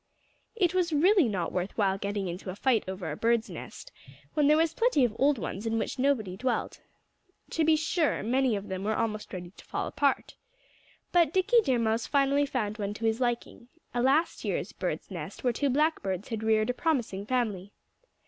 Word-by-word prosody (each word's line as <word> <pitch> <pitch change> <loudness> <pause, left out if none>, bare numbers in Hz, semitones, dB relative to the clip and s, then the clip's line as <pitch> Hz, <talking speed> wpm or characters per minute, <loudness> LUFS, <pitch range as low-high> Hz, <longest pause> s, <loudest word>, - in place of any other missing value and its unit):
It 365 -6 +2
was 360 -2 +1
really 345 - +4
not 180 -5 -2
worth 180 +2 -3
while 195 -3 +1
getting 200 -1 -2
into 180 +2 -6
a 185 - -5
fight 240 +1 +2
over 185 -4 -4
a - - -3
bird's 230 +4 +1
nest, - - -9 0.4
when 300 -2 +3
there 300 +1 +5
was 325 0 +2
plenty 455 - +3
of 220 -2 -3
old 280 +1 +4
ones 195 +3 -4
in 225 0 0
which 240 - -3
nobody 245 -9 +1
dwelt. 245 +4 -2 0.7
To 325 - +1
be 315 0 +5
sure, 320 0 0
many 255 +1 +2
of 200 0 -5
them 190 0 -4
were 215 +1 0
almost 215 -2 -2
ready 175 -2 -7
to - - -16
fall - - -3
apart. 280 -2 0 0.8
But 340 -4 +4
Dickie 405 +6 +4
Deer 260 - +1
Mouse 225 0 0
finally 280 0 +2
found 215 -5 -2
one 205 0 -3
to 225 - -4
his 225 +2 +1
liking 240 0 -2 0.3
a 240 - 0
last 280 +6 +2
year's - - -2
bird's - - -4
nest - - -7
where 245 -2 +2
two 280 +4 0
Blackbirds 255 - 0
had 225 -2 -3
reared 220 +1 +2
a - - -5
promising 240 - -1
family. 210 -6 -1
235 Hz, 195 wpm, -28 LUFS, 205-290 Hz, 0.8 s, there